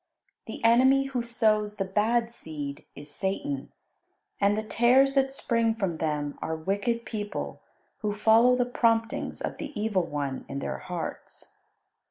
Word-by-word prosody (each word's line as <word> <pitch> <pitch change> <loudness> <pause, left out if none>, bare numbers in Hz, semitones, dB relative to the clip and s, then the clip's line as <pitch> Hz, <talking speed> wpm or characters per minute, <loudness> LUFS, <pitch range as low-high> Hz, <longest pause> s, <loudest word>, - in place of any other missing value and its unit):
The - - -7
enemy 260 +4 +5
who 265 -3 -2
sows 215 -3 +1
the 195 - -2
bad 225 +4 +1
seed 150 -8 -6
is 145 +1 -9
Satan, 200 - -3 0.7
and 205 +1 +3
the 215 - -1
tares 250 +5 +4
that 270 -1 +2
spring 230 -4 +1
from 190 -7 -2
them 150 -2 -2
are 160 - -2
wicked 200 +8 -1
people 210 -2 -5 0.4
who 210 -2 -1
follow 225 +4 +5
the 250 -1 +1
promptings 230 -2 0
of - - -4
the 285 -7 -6
evil 205 -5 0
one 140 -3 -3
in 140 - -4
their 140 - -3
hearts. 180 -3 -7
215 Hz, 150 wpm, -27 LUFS, 185-240 Hz, 0.7 s, enemy